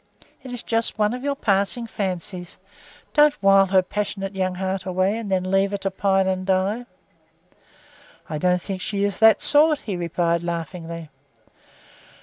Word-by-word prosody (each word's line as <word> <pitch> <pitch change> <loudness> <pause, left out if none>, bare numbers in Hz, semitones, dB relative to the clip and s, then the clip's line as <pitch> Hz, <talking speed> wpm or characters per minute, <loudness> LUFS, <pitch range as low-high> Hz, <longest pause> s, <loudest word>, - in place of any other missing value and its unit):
It 260 -2 -9
is 245 -1 -6
just 225 -1 -1
one 210 +1 +2
of 250 +1 -6
your 285 0 -1
passing 200 +1 +1
fancies. 185 -4 -4 0.6
Don't 295 -1 +5
wile 195 0 +6
her 190 0 +3
passionate 195 0 -4
young 185 -1 -1
heart 190 +1 -3
away 185 +2 0
and 225 -3 -5
then 185 0 0
leave 195 +1 +3
her 200 - -2
to 195 0 -3
pine 195 0 +1
and 185 0 -1
die." 195 +5 0 1.4
"I 155 - -4
don't 180 +1 +1
think 190 -2 -5
she 200 0 -2
is 200 -2 -1
that 220 -1 +6
sort," 300 0 +4
he 200 - -4
replied 170 -1 0
laughingly. 170 -1 -5
195 Hz, 160 wpm, -23 LUFS, 185-215 Hz, 1.4 s, wile